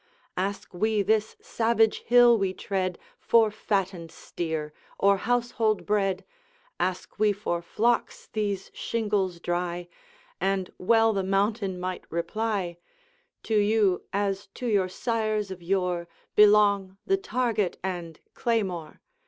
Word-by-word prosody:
Ask 195 +2 -3
we 215 +3 +1
this 215 +1 +1
savage 225 -1 +2
hill 245 0 +6
we 195 -3 -1
tread 185 -2 -2 0.2
For 225 -2 +4
fattened 195 -5 -2
steer 160 -4 -4 0.2
or 200 0 +4
household 230 -1 0
bread, 195 -2 0 0.5
Ask 185 +1 -2
we 215 -1 +4
for 195 -4 -2
flocks 230 +7 0
these 205 -3 -2
shingles 205 -6 -1
dry, 175 0 -2 0.5
And 195 -1 -1
well 225 +3 +4
the 195 - 0
mountain 195 0 0
might 185 0 -5
reply, 185 0 -2 0.7
"To 220 - -1
you, 205 -3 +3
as 200 -1 -1
to 250 - -6
your 200 -5 +2
sires 215 -1 -1
of 185 -1 -7
yore, 180 -1 -1 0.3
Belong 205 -2 +5
the 390 - +2
target 235 - -1
and 175 -4 -4
claymore! 190 -9 -2
200 Hz, 120 wpm, -27 LUFS, 185-220 Hz, 0.7 s, hill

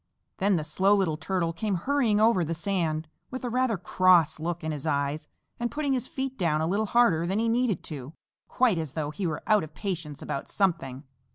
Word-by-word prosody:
Then 195 0 +3
the 160 - -1
Slow 190 +7 +3
Little 185 -6 +1
Turtle 165 +1 -1
came 210 +2 -1
hurrying 230 +1 +1
over 220 -5 +4
the 165 +1 -2
sand 165 -3 -1 0.2
with 260 0 -6
a 245 - -2
rather 250 -3 +1
cross 175 -3 +3
look 170 +1 -3
in 160 - -2
his 150 0 -5
eyes 145 +1 -1 0.3
and 240 0 -1
putting 290 -1 -1
his 255 -3 -1
feet 265 -1 -4
down 160 -4 +1
a 160 - 0
little 205 +6 0
harder 200 -8 +3
than 190 +3 0
he 230 +1 +1
needed 235 -3 +1
to 145 -2 -7 0.3
quite 235 -9 +2
as 155 -4 -5
though 150 -2 -2
he 185 +3 -3
were 155 - -4
out 215 -4 +4
of 155 -1 -10
patience 165 -6 -4
about 140 - -4
something. 155 -9 -1
180 Hz, 210 wpm, -27 LUFS, 155-220 Hz, 0.3 s, over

